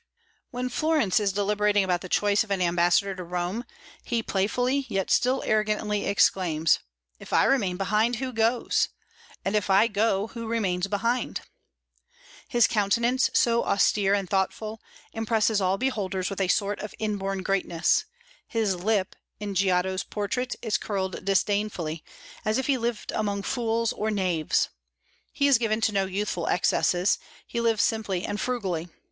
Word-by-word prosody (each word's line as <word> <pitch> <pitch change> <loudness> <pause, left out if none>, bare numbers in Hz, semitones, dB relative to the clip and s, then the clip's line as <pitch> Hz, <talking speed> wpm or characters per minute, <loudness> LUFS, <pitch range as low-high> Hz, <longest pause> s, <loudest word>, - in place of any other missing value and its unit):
When 250 0 -3
Florence 305 - +2
is 205 -2 +1
deliberating 205 +1 +2
about 180 -2 0
the 185 - -8
choice 205 +3 +2
of 220 - -15
an 195 -1 0
ambassador 175 +2 +2
to 185 -1 -7
Rome, 180 +6 -3 0.4
he 235 -2 -1
playfully, 250 +8 0
yet 195 -1 -1
still 255 +2 +2
arrogantly, 210 -1 0
exclaims: 170 -5 +2 0.4
"If - - -12
I - - +4
remain 200 -10 +2
behind, 215 +5 +1
who 255 +2 -4
goes? 225 +2 +1 0.6
and 195 +2 0
if 210 -2 0
I 195 +4 +5
go, 210 -2 +1
who 230 -2 -7
remains 195 -5 0
behind?" 230 +5 -1 1.1
His 240 -2 +4
countenance, 235 +5 +2
so 235 -4 +3
austere 200 0 +2
and 195 -2 -2
thoughtful, 215 +3 -2 0.3
impresses 220 -1 +1
all 190 +1 +1
beholders 195 -7 -2
with 195 - -3
a 190 - +2
sort 200 +2 0
of 210 - -7
inborn 195 -3 -2
greatness; 185 -4 +1 0.4
his 220 -4 0
lip, 195 +1 0 0.2
in 205 -1 -4
Giotto's 185 0 +1
portrait, 250 +5 -3
is 220 -3 0
curled 190 -3 -3
disdainfully, 195 -4 0 0.4
as 215 -1 +1
if 265 - -1
he 280 - +2
lived 235 -3 -3
among 200 -2 -2
fools 230 -1 0
or 215 - -2
knaves. 185 -7 0 0.6
He 285 -1 0
is 275 -4 +5
given 220 -2 0
to 220 - +2
no 195 -1 +1
youthful 190 -3 -2
excesses; 180 +1 +2 0.3
he 235 - -3
lives 225 -2 +2
simply 200 -5 -1
and 205 - -3
frugally. 190 -9 -2
205 Hz, 155 wpm, -26 LUFS, 190-225 Hz, 1.1 s, I